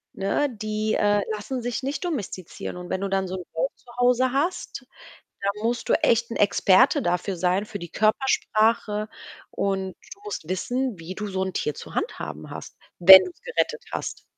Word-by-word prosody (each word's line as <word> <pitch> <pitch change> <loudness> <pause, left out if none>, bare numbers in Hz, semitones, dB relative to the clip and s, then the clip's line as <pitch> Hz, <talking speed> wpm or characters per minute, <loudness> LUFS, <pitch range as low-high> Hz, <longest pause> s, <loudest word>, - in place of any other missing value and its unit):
Ne, 200 +9 0
die, 215 -1 -2
äh, 205 0 +3
lassen 215 +5 -4
sich 245 +2 -3
nicht 280 +7 -3
domestizieren. 205 - -5
Und 180 0 -8
wenn 190 - -2
du 200 - -1
dann 195 -1 0
so 185 - -4
'n 180 - -7
Wolf 165 +11 -1
zu 250 - -30
Hause 250 +1 +3
hast, 340 +7 -2 0.6
dann 200 0 +1
musst 235 +1 -1
du - - +4
echt 235 -5 +2
'n - - -3
Experte 200 -2 +4
dafür 180 +2 -1
sein 185 +3 +1
für 210 - -6
die 170 -1 -8
Körpersprache 215 - +1 0.4
und 190 -2 -2 0.2
du 400 - -26
musst 420 - -6
wissen, 245 +6 -2
wie 165 +2 -7
du 210 +1 -4
so 190 -1 -2
'n 190 - -3
Tier 150 - -1
zu - - -10
handhaben 75 0 -4
hast, - - -9 0.2
wenn 190 +2 +11
du's 180 - -11
gerettet 475 - -1
hast. - - -5
210 Hz, 185 wpm, -24 LUFS, 185-245 Hz, 0.6 s, wenn